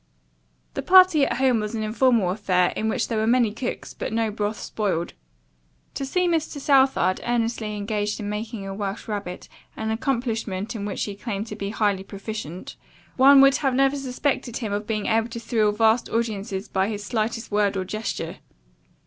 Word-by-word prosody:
The - - -3
party 365 -6 +6
at - - -2
home 260 -3 +3
was 210 +1 -3
an 220 - -2
informal 220 -3 +2
affair 185 -3 +1
in 220 - -1
which - - 0
there 225 -2 -1
were 220 - +1
many 235 -3 +3
cooks, 245 +2 -5
but - - -5
no 225 -1 0
broth 210 0 -2
spoiled. 185 -6 -2 0.8
To 275 - -4
see 360 +6 +1
Mr. 320 -3 -1
Southard 270 -9 +3
earnestly 230 -2 -1
engaged 205 0 -2
in 205 - -4
making 210 0 -4
a 195 - -5
Welsh 200 -1 -4
rarebit, 200 -4 -5 0.3
an 220 0 -2
accomplishment 230 -4 -2
in 205 -2 -4
which 205 - -3
he 205 - -4
claimed 205 0 -4
to 210 - -5
be 200 -1 -4
highly 205 -3 0
proficient, 195 -3 -7 0.4
one 270 +1 +8
would 275 +1 +5
never 265 -2 +1
have 275 +1 +3
suspected 260 -2 -2
him 215 -5 -3
of 210 +1 -3
being 215 -2 -2
able 225 +1 +1
to 235 0 -6
thrill 220 -2 +1
vast 220 +2 +2
audiences 210 -3 -2
by 190 0 0
his 205 -2 -4
slightest 220 +1 -2
word 205 -1 +2
or 185 - -2
gesture. 215 +4 -4
220 Hz, 185 wpm, -24 LUFS, 205-245 Hz, 0.8 s, one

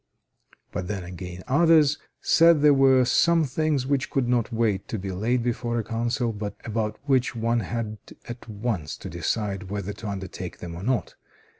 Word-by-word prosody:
But 90 - -4
then 100 -2 -3
again 90 0 -8
others 150 +1 +4 0.2
said 165 -3 +5
there 150 -1 +7
were 135 -2 +5
some 170 +6 +4
things 145 -1 0
which 135 -1 0
could 135 -3 0
not 120 -2 +1
wait 110 -4 0
to 110 - -3
be 95 -1 -4
laid 115 +6 0
before 120 0 -1
a 115 - 0
Council, 115 +2 -1
but 105 -1 -5
about 110 -1 -2
which 130 -4 +2
one 115 +1 +1
had 110 -2 -4 0.3
at 120 0 -8
once 105 - -3
to - - -8
decide 100 -3 -2
whether 100 0 -3
to 105 +2 -8
undertake 95 -2 -6
them 85 -1 -7
or 85 - -7
not. 120 +3 -1
115 Hz, 175 wpm, -25 LUFS, 100-130 Hz, 0.3 s, there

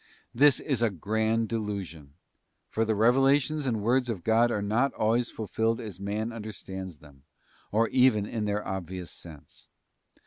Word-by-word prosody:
This 140 +1 +5
is 135 -6 -1
a 115 - +3
grand 110 +4 0
delusion, 95 -10 -5 0.6
for 115 - +1
the 110 0 +1
revelations 135 +6 +3
and 110 -4 -1
words 125 +2 +2
of 100 -7 -3
God 115 +3 +4
are 105 -3 -1
not 120 +7 +1
always 115 +2 +1
fulfilled 110 +2 -1
as 105 -5 -7
man 105 +3 -3
understands 95 -5 -7
them, 70 -2 -18 0.5
or 115 +2 +3
even 125 -5 +4
in 110 0 -3
their 105 0 -2
obvious 95 -2 -5
sense. 80 -4 -12
110 Hz, 150 wpm, -28 LUFS, 100-120 Hz, 0.6 s, This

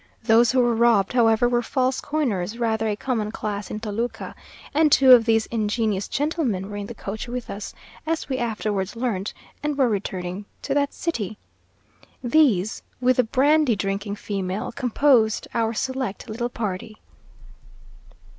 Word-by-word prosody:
Those 225 +1 +5
who 260 - +2
were 240 -1 +2
robbed, 225 -4 +3
however, 235 -1 +4
were 240 0 +1
false 255 +2 0
coiners, 230 -9 -2
rather 225 -2 0
a 210 - 0
common 215 -2 -2
class 205 -2 -4
in 215 - -4
Toluca, 225 +2 -4 0.4
and 305 0 +4
two 265 -1 +6
of 240 -3 +8
these 225 -1 +3
ingenious 215 -2 0
gentlemen 270 - -1
were - - -6
in 200 -1 -5
the 235 - -8
coach 210 +3 -6
with 245 0 -5
us 200 +1 -7 0.3
(as 325 0 -1
we 265 -2 -2
afterwards 215 -4 -2
learnt), 225 -5 -2 0.3
and 295 -1 -2
were 265 -3 +4
returning 190 -2 -3 0.2
to 275 - -1
that 285 0 0
city. 215 - -3 0.9
These, 235 - +2 0.2
with 255 0 +2
the 250 - +5
brandy 275 +2 +3
drinking 200 +1 -3
female, 195 -1 -3
composed 245 -3 +2
our 225 -1 +1
select 260 -2 -3
little 235 +2 -3
party! 215 -1 -5
225 Hz, 155 wpm, -23 LUFS, 210-255 Hz, 0.9 s, of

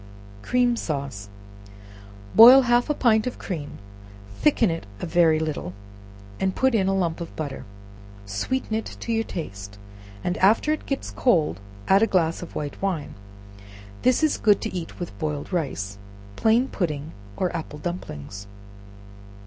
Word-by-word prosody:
Cream 245 - +2
Sauce. 140 - -4 1.0
Boil 250 +4 +10
half 240 +2 +2
a - - +3
pint 220 -3 +3
of 250 - -4
cream, 150 -6 -6 0.6
thicken 245 - +3
it 165 -9 -5
a - - -4
very 165 -2 +4
little, 155 - -3 0.7
and 190 -1 0
put 265 -1 +2
in 195 -4 +2
a 195 - +1
lump 170 -3 -1
of 170 - -7
butter; 145 -4 -5 0.6
sweeten 105 - -3
it 220 0 -3
to 235 - -4
your 225 0 +1
taste, 100 - -7 0.5
and 180 - -1
after 220 +10 +4
it 310 - -6
gets 275 - -3
cold 160 - +1 0.3
add 195 +1 +5
a 225 - +4
glass 165 -5 +1
of 175 - -9
white 145 -1 -5
wine; 185 -6 -2 0.9
this 255 +4 +3
is 310 - +2
good 210 -2 +4
to - - -4
eat 175 -3 -6
with 175 - -6
boiled 150 +2 -3
rice, 105 - -3 0.4
plain 230 +4 +3
pudding, 155 - -3 0.3
or 180 -2 -1
apple 160 -2 -5
dumplings. 100 - -6
175 Hz, 150 wpm, -24 LUFS, 150-225 Hz, 1.0 s, Boil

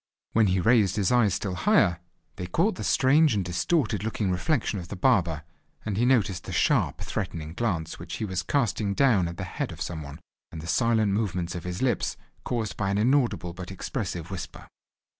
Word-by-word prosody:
When 110 -2 +4
he 95 0 +2
raised 105 -2 +3
his 105 0 +1
eyes 115 -6 +3
still 100 -3 -3
higher, 115 - +3 0.4
they 90 - -4
caught 180 - +1
the - - -6
strange 145 0 +4
and 100 -3 -1
distorted 105 - 0
looking 105 -3 -1
reflection 105 - 0
of 85 - -8
the 100 - -6
barber, 90 - +2 0.4
and 105 -3 -2
he 120 +4 +2
noticed 110 -8 +2
the - - -6
sharp - - +1
threatening 80 -1 -4
glance 90 -7 -2
which - - -6
he 110 - -3
was 95 -2 -2
casting 110 -7 0
down 115 -10 +3
on 85 - -6
the 95 - -5
head 90 - -4
of - - -10
some 80 -3 -4
one, 70 +1 -9 0.3
and 80 - -7
the 80 - -8
silent 110 +2 +2
movements 95 -5 -1
of 85 -1 -6
his 90 +5 -3
lips, 125 -5 0 0.3
caused 115 -4 -3
by 100 -2 -1
an 100 - 0
inaudible 120 -7 +1
but 90 0 -8
expressive 95 -3 -4
whisper. 95 -3 -7
100 Hz, 195 wpm, -26 LUFS, 90-115 Hz, 0.4 s, When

